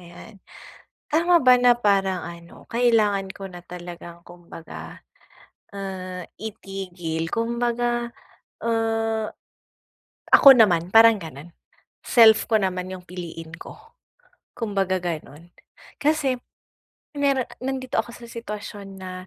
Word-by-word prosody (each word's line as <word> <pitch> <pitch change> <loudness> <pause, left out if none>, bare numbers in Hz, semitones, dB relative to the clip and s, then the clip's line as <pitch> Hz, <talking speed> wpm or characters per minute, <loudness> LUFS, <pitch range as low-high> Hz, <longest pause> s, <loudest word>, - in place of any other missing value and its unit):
ayan. 175 +3 -14 0.7
Tama 340 +3 +4
ba 255 -1 +7
na 245 -1 +5
parang 195 -4 +1
ano 170 0 -11
kailangan 220 -5 +2
ko 195 -1 -7
na 175 -1 -11
talagang 175 -1 -10
kumbaga, 175 -2 -11 0.8
ah, 185 -2 -6 0.2
itigil 185 -6 -5
kumbaga, 240 +1 -1 0.6
ah, 225 -1 0 1.1
ako - - +9
naman 175 -6 +4
parang 225 +1 +7
ganun 155 +1 -10 0.6
self 225 -3 +6
ko 225 - +2
naman 185 -1 -2
yung 185 -1 -8
piliin 170 -3 -8
ko, - - -10 0.8
kumbaga 195 -4 -1
ganun. 165 -2 -6 0.5
Kasi 290 -3 +2 0.8
meron 275 -3 +1
nandito 260 0 -3
ako 235 - -2
sa 240 - -12
sitwasyon 210 -3 -7
na, 185 0 -6
200 Hz, 105 wpm, -23 LUFS, 180-235 Hz, 1.1 s, ako